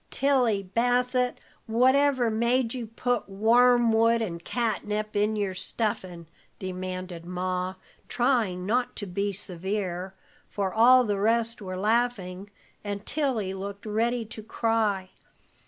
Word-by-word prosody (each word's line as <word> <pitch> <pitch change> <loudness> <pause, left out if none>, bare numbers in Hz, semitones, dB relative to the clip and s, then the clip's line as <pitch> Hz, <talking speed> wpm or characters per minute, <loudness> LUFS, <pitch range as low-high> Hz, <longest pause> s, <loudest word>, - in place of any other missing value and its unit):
"Tilly 250 -7 +2
Bassett, 245 +5 +1 0.3
whatever 255 +1 +3
made 235 +2 +1
you 245 -3 -5
put 245 0 -2
wormwood 230 +2 +4
and 170 -7 -4
catnip 215 -2 -2
in 210 +1 +1
your 200 -3 -1
stuffin'?" 185 -2 -3 0.3
demanded 185 -2 -5
Ma, 180 +1 -3 0.3
trying 230 -8 +1
not 245 +5 0
to 205 - -5
be 200 +2 -2
severe, 190 0 -4 0.3
for 195 -2 -2
all 250 +3 +6
the 205 -4 -1
rest 230 +2 +1
were 185 -2 -5
laughing, 205 -3 0 0.3
and 205 0 -5
Tilly 245 -10 -1
looked 200 +2 -7
ready 230 +2 0
to 220 0 -9
cry. 215 -4 0
215 Hz, 120 wpm, -27 LUFS, 190-240 Hz, 0.3 s, all